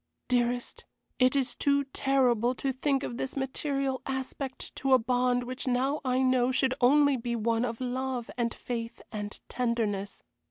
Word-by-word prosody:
Dearest, 245 Hz, 0 st, 0 dB, 0.4 s
it 255 Hz, +1 st, +4 dB
is 260 Hz, -3 st, +1 dB
too 280 Hz, +2 st, +2 dB
terrible 255 Hz, -3 st, +2 dB
to 270 Hz, +1 st, -1 dB
think 275 Hz, +1 st, 0 dB
of 235 Hz, -, -4 dB
this 265 Hz, +1 st, -3 dB
material 270 Hz, -1 st, -1 dB
aspect 265 Hz, 0 st, -5 dB
to 270 Hz, -1 st, +2 dB
a -, -, +9 dB
bond 245 Hz, +1 st, +1 dB
which 255 Hz, +2 st, -5 dB
now 265 Hz, +4 st, +1 dB
I 255 Hz, 0 st, +1 dB
know 255 Hz, -1 st, +3 dB
should 260 Hz, 0 st, +2 dB
only 285 Hz, +2 st, +5 dB
be 235 Hz, 0 st, -2 dB
one 230 Hz, +1 st, +1 dB
of 230 Hz, -2 st, -4 dB
love 255 Hz, -1 st, -3 dB
and 235 Hz, -1 st, 0 dB
faith 230 Hz, -1 st, -5 dB
and 210 Hz, -1 st, -5 dB
tenderness. 220 Hz, -5 st, -2 dB
255 Hz, 160 wpm, -29 LUFS, 240-265 Hz, 0.4 s, a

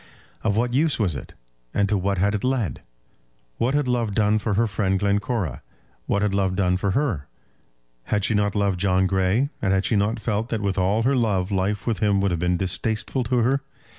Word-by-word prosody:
Of 105 Hz, -1 st, +1 dB
what 120 Hz, +1 st, +1 dB
use 150 Hz, +3 st, +2 dB
was 95 Hz, -9 st, 0 dB
it, -, -, -9 dB, 0.4 s
and 100 Hz, -1 st, +2 dB
to 105 Hz, -, +1 dB
what 100 Hz, 0 st, 0 dB
had 100 Hz, +3 st, +2 dB
it 105 Hz, -, -2 dB
led? 125 Hz, -7 st, -1 dB, 0.8 s
What 130 Hz, +4 st, +1 dB
had 145 Hz, -2 st, +1 dB
love 120 Hz, -5 st, 0 dB
done 105 Hz, 0 st, +3 dB
for 105 Hz, -1 st, -1 dB
her 115 Hz, +3 st, +3 dB
friend 100 Hz, -2 st, 0 dB
Glencora? 100 Hz, -, -1 dB, 0.5 s
What 100 Hz, +1 st, +1 dB
had 105 Hz, -2 st, +1 dB
love 95 Hz, -2 st, +1 dB
done 90 Hz, -2 st, +2 dB
for 100 Hz, +2 st, -1 dB
her? 110 Hz, -, -1 dB, 0.8 s
Had 105 Hz, -1 st, 0 dB
she 110 Hz, -, +1 dB
not 105 Hz, 0 st, +1 dB
loved 100 Hz, -3 st, +1 dB
John 95 Hz, 0 st, +3 dB
Grey, 95 Hz, +8 st, +1 dB
and 95 Hz, -2 st, +1 dB
had 95 Hz, 0 st, +1 dB
she 115 Hz, -, +1 dB
not 105 Hz, +3 st, +1 dB
felt 110 Hz, +1 st, -2 dB
that 110 Hz, -2 st, -2 dB
with 100 Hz, -1 st, 0 dB
all 100 Hz, +5 st, +2 dB
her 135 Hz, +3 st, +2 dB
love 105 Hz, -6 st, 0 dB
life 100 Hz, +2 st, -1 dB
with 115 Hz, -6 st, -1 dB
him 100 Hz, -1 st, +2 dB
would 100 Hz, -1 st, +1 dB
have 85 Hz, -, -1 dB
been 90 Hz, +1 st, +1 dB
distasteful 105 Hz, +7 st, -1 dB
to 125 Hz, +2 st, 0 dB
her? 135 Hz, +4 st, +2 dB
100 Hz, 215 wpm, -23 LUFS, 95-115 Hz, 0.8 s, done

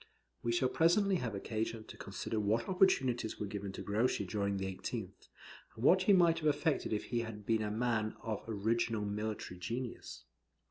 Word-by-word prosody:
We 120 Hz, -, 0 dB
shall 120 Hz, +2 st, +2 dB
presently 185 Hz, +7 st, +3 dB
have 115 Hz, -8 st, -3 dB
occasion 110 Hz, +2 st, -3 dB
to -, -, -11 dB
consider 110 Hz, -, -4 dB
what 110 Hz, +3 st, +1 dB
opportunities 130 Hz, -, +2 dB
were 105 Hz, -, -1 dB
given 100 Hz, -1 st, -5 dB
to -, -, -6 dB
Grouchy 105 Hz, 0 st, +1 dB
during 100 Hz, +1 st, -1 dB
the 95 Hz, -, -2 dB
18th, 95 Hz, -1 st, -5 dB, 0.5 s
and 115 Hz, -, -7 dB
what 185 Hz, +7 st, +6 dB
he 190 Hz, -, +4 dB
might 170 Hz, -3 st, +5 dB
have 155 Hz, -, 0 dB
effected 150 Hz, 0 st, +1 dB
if 105 Hz, -1 st, 0 dB
he 120 Hz, -, -1 dB
had 110 Hz, -3 st, -6 dB
been 110 Hz, 0 st, +2 dB
a 105 Hz, -, -1 dB
man 110 Hz, -1 st, 0 dB
of 110 Hz, -2 st, -3 dB
original 110 Hz, 0 st, 0 dB
military 105 Hz, -3 st, -4 dB
genius. 115 Hz, +7 st, -5 dB
115 Hz, 180 wpm, -34 LUFS, 105-130 Hz, 0.5 s, what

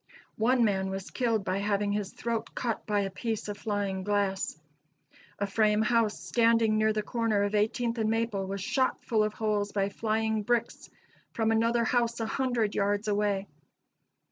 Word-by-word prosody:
One 240 Hz, +2 st, +4 dB
man 190 Hz, -2 st, 0 dB
was 190 Hz, 0 st, -5 dB
killed 230 Hz, -5 st, 0 dB
by 185 Hz, +1 st, 0 dB
having 205 Hz, 0 st, 0 dB
his 205 Hz, -1 st, -2 dB
throat 230 Hz, -1 st, -4 dB
cut 235 Hz, -3 st, -3 dB
by 205 Hz, -1 st, +2 dB
a 195 Hz, -1 st, -2 dB
piece 220 Hz, +2 st, -3 dB
of 205 Hz, -, -4 dB
flying 200 Hz, -3 st, -2 dB
glass. 200 Hz, -4 st, -1 dB, 0.8 s
A 200 Hz, -, 0 dB
frame 210 Hz, +1 st, +2 dB
house, 225 Hz, -1 st, +2 dB
standing 230 Hz, -2 st, +3 dB
near 215 Hz, 0 st, +3 dB
the 215 Hz, 0 st, -1 dB
corner 225 Hz, -4 st, 0 dB
of 205 Hz, +1 st, -1 dB
Eighteenth 230 Hz, +3 st, 0 dB
and 220 Hz, -1 st, +1 dB
Maple, 225 Hz, -4 st, -1 dB
was 195 Hz, 0 st, -4 dB
shot 260 Hz, +6 st, 0 dB
full 220 Hz, -2 st, +2 dB
of 215 Hz, 0 st, -1 dB
holes 210 Hz, -2 st, 0 dB
by 195 Hz, -1 st, 0 dB
flying 220 Hz, +1 st, 0 dB
bricks 235 Hz, +2 st, -1 dB, 0.4 s
from 225 Hz, -1 st, +1 dB
another 230 Hz, +1 st, +2 dB
house 235 Hz, -1 st, +1 dB
a 225 Hz, -, -1 dB
hundred 240 Hz, -3 st, 0 dB
yards 205 Hz, +1 st, 0 dB
away. 205 Hz, -1 st, +1 dB
215 Hz, 170 wpm, -29 LUFS, 205-230 Hz, 0.8 s, One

